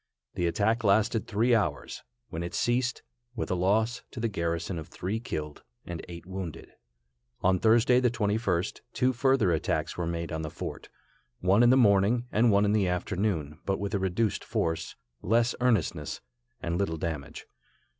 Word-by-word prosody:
The 85 - 0
attack 110 +7 +1
lasted 105 +2 +2
three 115 +3 +2
hours, 100 -11 -1 0.3
when 80 - -4
it 85 - -4
ceased, 125 +1 0 0.3
with 110 - -3
a - - +3
loss 110 +6 +1
to 125 - -8
the 115 - +1
garrison 85 -3 -2
of 80 - -8
three 100 +5 -3
killed 75 -10 -5 0.2
and 85 -2 -6
eight 85 0 -9
wounded. 95 -3 -7 0.7
On 95 0 +3
Thursday, 115 +4 +5
the 125 -1 +3
21st, 105 -5 -1
two 130 +1 +2
further 130 -6 +3
attacks 80 - -1
were 85 - -1
made 85 0 -3
on 80 -1 -2
the 80 - -4
fort, - - -7 0.5
one 95 +4 +4
in 120 - +6
the 130 - +6
morning 110 +1 +4
and 115 +2 +4
one 100 0 +4
in 100 - +2
the 105 -3 +2
afternoon, 90 -4 -1
but 95 -1 0
with 100 +1 -3
a 100 - +1
reduced 95 +3 0
force, 80 0 -2 0.3
less 115 +4 +2
earnestness, 115 -9 0 0.4
and 85 +1 -1
little 80 -5 -1
damage. 80 -3 -5
100 Hz, 170 wpm, -28 LUFS, 85-115 Hz, 0.7 s, in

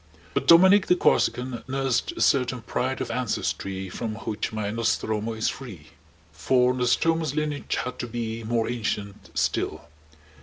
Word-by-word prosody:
But - - -1
Dominic 190 +4 +7
the 180 - +5
Corsican 125 -7 +1
nursed 135 - 0
a 345 - -6
certain 125 -3 +2
pride 130 +2 -2
of - - -3
ancestry 95 -5 -2
from 110 +4 -4
which 110 -1 -4
my 105 -2 -3
Nostromo 115 -1 -1
is 110 0 -1
free; 95 - -6 0.4
for 125 +9 +2
Nostromo's 145 +5 +1
lineage 150 -2 -2
had 125 +2 -4
to 120 - -3
be 115 -1 -4
more 115 0 0
ancient 105 -4 -4
still. - - -1
120 Hz, 145 wpm, -25 LUFS, 110-130 Hz, 0.4 s, Dominic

